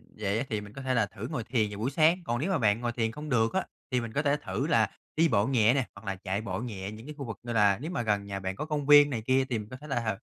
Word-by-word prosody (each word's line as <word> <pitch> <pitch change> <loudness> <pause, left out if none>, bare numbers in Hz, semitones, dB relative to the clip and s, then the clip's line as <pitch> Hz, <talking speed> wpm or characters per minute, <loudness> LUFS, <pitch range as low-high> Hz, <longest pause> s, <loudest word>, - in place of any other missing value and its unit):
dậy 105 0 -1
á 140 - -2
thì 110 -2 -1
mình 105 0 -11
có 135 - -8
thể 130 -1 -1
là 115 -3 +3
thử 110 +2 -7
ngồi 120 -3 -3
thiền 115 -3 0
vào 105 0 -7
buổi 120 +5 -1
sáng, 160 +5 +4
còn 120 -4 -1
nếu 170 +9 -1
mà 185 - +2
bạn 110 -5 +2
ngồi 120 - -1
thiền 115 -1 -1
không 150 +6 -7
được 115 -3 +2
á 190 - 0 0.3
thì 125 -1 +2
mình 115 -1 -6
có 145 - +1
thể 145 0 +2
thử 145 0 -2
là 115 -9 +3 0.3
đi 165 +2 +4
bộ 105 -7 +2
nhẹ 120 -3 +4
nè, 135 -2 +1
hoặc 100 +2 -13
là 95 -1 -2
chạy 95 +1 -3
bộ 95 -4 -3
nhẹ 105 -5 -5
những 110 +2 -10
cái 150 - -7
khu 140 - -5
vực 115 -4 -6
như 120 - -4
là 105 -3 +4
nếu 160 - -4
mà 180 - -1
gần 105 -3 0
nhà 100 -1 -4
bạn 95 0 -3
có 125 - -4
công 150 -2 -2
viên 145 0 +8
này 120 -5 -2
kia, 130 0 +3
thì 115 - 0
mình 105 0 -8
có 130 - -7
thể 150 - -10
là 115 -7 -1
115 Hz, 340 wpm, -29 LUFS, 105-140 Hz, 0.3 s, viên